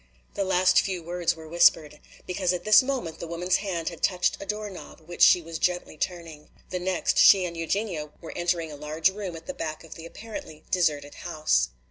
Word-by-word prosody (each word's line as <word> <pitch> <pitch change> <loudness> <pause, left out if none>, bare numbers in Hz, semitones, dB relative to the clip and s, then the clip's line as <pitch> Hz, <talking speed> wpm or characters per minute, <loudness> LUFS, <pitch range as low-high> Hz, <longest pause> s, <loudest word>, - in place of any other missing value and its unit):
The 200 - -1
last 185 -1 +4
few 185 -3 -4
words 175 0 -1
were 160 -1 -11
whispered. 155 -2 +3 0.3
Because 180 0 0
at 175 -1 -4
this 215 +3 +7
moment 255 -11 -4
the 170 - -6
woman's 175 +2 0
hand 175 -5 -3
had 170 - -11
touched 180 -2 +1
a 200 - -8
door 210 +1 -3
knob 185 -3 -11
which 175 +2 -10
she 175 - +7
was 165 0 -6
gently 180 -3 -1
turning. 165 -2 -5 0.2
The 180 - -2
next 180 0 0
she 190 -2 +7
and 170 -1 -5
Eugenia 165 -2 -2
were 165 - -9
entering 175 -2 -1
a - - -8
large 155 +4 0
room 195 -3 -6
at 160 - -10
the - - -5
back 155 -1 -5
of 165 - -11
the 165 0 -10
apparently 220 - -9
deserted 150 -5 0
house. 155 - 0
175 Hz, 205 wpm, -26 LUFS, 160-185 Hz, 0.3 s, this